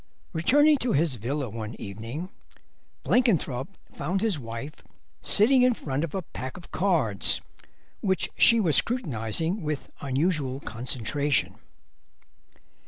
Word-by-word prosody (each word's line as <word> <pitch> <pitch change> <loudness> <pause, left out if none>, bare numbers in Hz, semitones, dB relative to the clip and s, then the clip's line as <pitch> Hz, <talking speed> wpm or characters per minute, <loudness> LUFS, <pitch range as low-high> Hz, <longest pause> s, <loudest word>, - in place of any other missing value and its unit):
Returning 290 - +4
to 250 -1 0
his 155 0 +2
villa 130 +5 -3
one 110 0 -6
evening 115 - -6 0.7
Blenkinthrope 170 - +1 0.2
found 175 +7 -2
his 210 -8 +1
wife 115 +4 -6 0.5
sitting 250 +5 +5
in 250 -1 +4
front 140 -4 -3
of 165 0 -4
a 190 - -2
pack 130 -2 -7
of 175 - -13
cards, 160 - +1 0.6
which 190 -2 0
she 230 - +6
was 170 -8 +4
scrutinising 165 - 0
with 150 -3 -4
unusual 140 -1 0
concentration. 130 +4 -1
150 Hz, 115 wpm, -26 LUFS, 125-190 Hz, 0.7 s, she